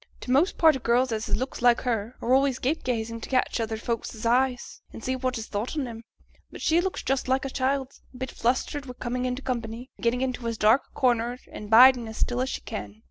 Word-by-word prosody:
T' 250 - -5
most 295 +9 +3
part 320 -3 +6
o' - - -3
girls 240 +1 +2
as 220 0 -2
has - - +1
looks 260 +2 -4
like 245 -1 +4
hers 230 -2 -2
are 245 - +2
always 270 -1 +3
gape 290 +6 -1
gazing 230 -2 -2
to - - -7
catch 255 -2 +1
other 225 -1 -2
folks's 230 -1 -4
eyes, 250 +1 +1
and 225 - -10
see 260 - -1
what 255 -1 -2
is 225 - -5
thought 220 +9 -4
on 275 -4 -1
'em; 225 -1 -8 0.5
but - - -9
she 330 +2 +3
looks 380 +1 -3
just 270 -1 -1
like 260 +1 +1
a 270 - -4
child, 265 0 -1 0.2
a 250 - -13
bit 260 0 -5
flustered 265 +3 -1
wi' 250 - -6
coming 250 +1 -2
into 255 +2 -3
company, 240 0 -4
and - - -16
gettin' 240 +2 +1
into 255 -2 -2
as 230 -1 -2
dark 220 +5 +4
a - - -32
corner 240 -1 +2
and 210 - -8
bidin' 245 +1 +7
as 220 - -8
still 245 0 0
as 260 - -1
she - - -4
can. 100 0 -6
250 Hz, 245 wpm, -26 LUFS, 230-260 Hz, 0.5 s, bidin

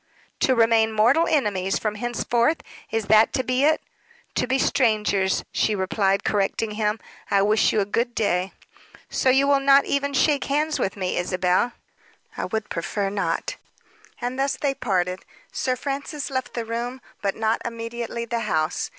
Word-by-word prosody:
"To 260 - +3
remain 225 -1 +4
mortal 240 +10 +4
enemies 200 -10 +1
from 215 -1 -2
henceforth? 240 +5 0 0.3
Is 225 -1 -1
that 215 +2 +5
to 260 - 0
be 255 +2 +1
it?" 310 +1 +2 0.5
"To - - 0
be 260 +1 +2
strangers," 210 -7 +1
she 215 - +1
replied, 195 0 +1
correcting 210 +1 0
him. 210 0 -1 0.3
"I 195 -1 +3
wish 215 +2 +3
you 215 - +2
a - - 0
good 235 +4 -1
day." 185 -3 0 0.6
"So 260 - +2
you 265 +2 +4
will 280 -1 +4
not 275 0 +5
even 280 0 -1
shake 285 +1 +2
hands 300 +2 0
with 190 - -1
me, 185 -2 -2
Isabel?" 185 +6 +1 0.6
"I - - -3
would 220 -2 -4
prefer 195 +4 -2
not." 200 0 -2 0.6
And 250 +2 -3
thus 275 0 +1
they 280 -2 0
parted. 185 -7 -1 0.3
Sir 255 -1 -1
Francis 280 +1 -4
left 260 -1 -3
the 235 -1 -2
room, 240 +3 -4 0.2
but 195 -1 -1
not 220 +1 0
immediately 235 0 -5
the 235 0 -2
house. 160 -7 -1
225 Hz, 165 wpm, -24 LUFS, 205-260 Hz, 0.6 s, that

